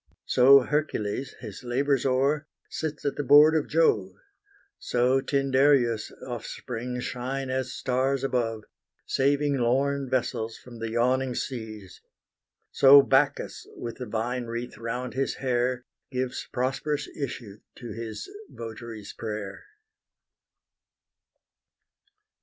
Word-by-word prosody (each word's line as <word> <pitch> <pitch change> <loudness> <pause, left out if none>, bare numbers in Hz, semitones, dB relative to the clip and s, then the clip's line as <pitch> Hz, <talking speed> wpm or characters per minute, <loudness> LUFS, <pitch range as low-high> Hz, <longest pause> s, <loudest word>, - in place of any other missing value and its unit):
So 135 +2 +7
Hercules, 135 -4 -2
His 110 -1 -8
labours 135 +2 +1
o'er, 140 +4 +1 0.2
sits 155 -2 -4
at 145 - -1
the 145 - -1
board 150 +4 +7
of 155 - +1
Jove: 105 - +2 0.6
So 125 +2 +2
Tyndareus' 135 -4 +2 0.2
offspring 125 0 -5
shine 130 +2 -3
as 130 -1 -2
stars 130 +1 0
above, 115 -5 -1 0.4
Saving 140 +1 +1
lorn 135 +3 +1
vessels 115 -3 -1
from 120 -2 -13
the 115 0 -3
yawning 125 +2 +1
seas: 110 -7 -6 0.7
So 140 +1 +8
Bacchus, 135 +2 +1
with 115 -1 -6
the 125 - -6
vine 120 +3 -2
wreath 120 +1 -5
round 125 +2 -4
his 135 +2 -1
hair, 125 -1 -1 0.2
Gives 130 -1 -3
prosperous 135 +3 -1
issue 120 -7 -6 0.2
to 120 - -8
his 115 - -6 0.2
votary's 115 -2 -8
prayer. 105 -3 -5
125 Hz, 110 wpm, -27 LUFS, 115-135 Hz, 0.7 s, So